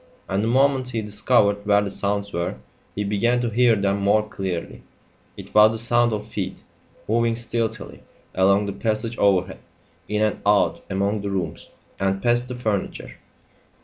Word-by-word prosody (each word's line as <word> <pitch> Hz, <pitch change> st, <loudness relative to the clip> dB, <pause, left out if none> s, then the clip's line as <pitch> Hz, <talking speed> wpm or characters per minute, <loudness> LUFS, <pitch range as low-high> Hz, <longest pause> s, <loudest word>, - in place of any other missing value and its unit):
And 95 Hz, +2 st, -1 dB
the -, -, 0 dB
moment 130 Hz, +1 st, +2 dB
he 115 Hz, -3 st, -3 dB
discovered 105 Hz, -1 st, +2 dB
where 100 Hz, 0 st, +3 dB
the 100 Hz, -, -4 dB
sounds 100 Hz, 0 st, -2 dB
were, 85 Hz, -2 st, -2 dB, 0.4 s
he 105 Hz, -, -1 dB
began 105 Hz, +5 st, +1 dB
to 120 Hz, -2 st, -1 dB
hear 120 Hz, 0 st, +4 dB
them 100 Hz, -1 st, 0 dB
more 105 Hz, +2 st, +2 dB
clearly. 95 Hz, -5 st, -5 dB, 0.6 s
It -, -, -11 dB
was 105 Hz, +1 st, +6 dB
the -, -, -3 dB
sound 120 Hz, +1 st, +2 dB
of 105 Hz, -1 st, -3 dB
feet, 100 Hz, -4 st, -5 dB, 0.4 s
moving 115 Hz, +1 st, +1 dB
stealthily 115 Hz, -1 st, -4 dB, 0.3 s
along 100 Hz, +2 st, +3 dB
the 100 Hz, -, -4 dB
passage 110 Hz, +3 st, -2 dB
overhead, 95 Hz, -2 st, +2 dB, 0.5 s
in 105 Hz, 0 st, 0 dB
and 110 Hz, -, -1 dB
out 105 Hz, 0 st, +2 dB
among 100 Hz, +2 st, -1 dB
the 100 Hz, -, -3 dB
rooms, 90 Hz, -6 st, -4 dB, 0.3 s
and 95 Hz, 0 st, 0 dB
past 120 Hz, +3 st, +1 dB
the 125 Hz, -, -6 dB
furniture. 110 Hz, -5 st, -3 dB
105 Hz, 165 wpm, -23 LUFS, 100-115 Hz, 0.6 s, was